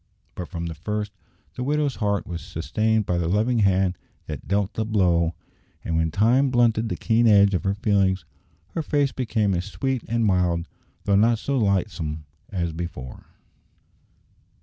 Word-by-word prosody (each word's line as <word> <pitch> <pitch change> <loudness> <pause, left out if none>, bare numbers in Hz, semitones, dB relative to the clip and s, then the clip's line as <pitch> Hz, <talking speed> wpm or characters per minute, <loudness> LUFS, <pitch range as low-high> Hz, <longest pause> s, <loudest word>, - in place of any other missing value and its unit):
But 90 - -6
from 85 -2 -5
the 85 - -4
first 105 +5 -3 0.4
the - - -6
widow's 145 0 0
heart 100 -2 0
was 85 -2 -5
sustained 110 +6 0
by 90 -1 0
the 85 - -1
loving 110 +6 +2
Hand 95 -3 +2 0.3
that - - -7
dealt 100 0 0
the 110 - -1
blow, 90 -6 +2 0.5
and 80 - -1
when 80 0 +2
time 120 - +3
blunted 115 -2 +2
the - - -2
keen 115 0 +2
edge 100 -2 +6
of 90 - -1
her 95 +1 +1
feelings 95 -4 +1 0.4
her 165 - -3
face 145 -3 +1
became 110 -5 0
as 90 0 -1
sweet 130 +3 -2
and 115 0 +1
mild, 90 -3 +1 0.4
though 100 - +2
not 115 +3 +4
so 140 +5 -2
lightsome, 95 - -1 0.3
as 85 -4 -2
before. 80 -7 -7
100 Hz, 165 wpm, -24 LUFS, 90-115 Hz, 0.5 s, edge